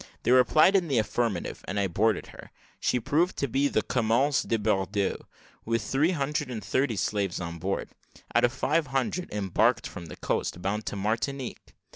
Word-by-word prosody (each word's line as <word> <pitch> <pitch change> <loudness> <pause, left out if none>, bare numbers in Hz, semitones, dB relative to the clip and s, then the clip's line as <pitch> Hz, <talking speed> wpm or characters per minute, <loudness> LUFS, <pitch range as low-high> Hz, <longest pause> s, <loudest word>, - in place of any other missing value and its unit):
They - - +2
replied 140 +9 +5
in 185 -3 +3
the 135 -5 +1
affirmative; 110 -3 -1
and 100 - -2
I 100 - +2
boarded 105 +3 +1
her. - - -12 0.3
She 125 - +1
proved 155 +8 +1
to 140 - 0
be 135 +3 +1
the 110 - 0
Commerce 125 +4 +2
de 115 - 0
Bordeaux, 100 -2 -1 0.4
with 115 -1 -1
three 135 +9 +2
hundred 150 -3 -1
and 110 -5 -5
thirty 130 +3 +1
slaves 100 -1 -1
on 85 -1 -5
board, 95 +4 -2 0.4
out - - +4
of 120 - +4
five 150 +4 0
hundred 135 +7 -2
embarked 105 +4 +1
from 85 -4 -7
the 75 - -9
coast, - - -2
bound 100 +4 -2
to - - -3
Martinique. 115 +6 -3
115 Hz, 180 wpm, -27 LUFS, 100-140 Hz, 0.4 s, replied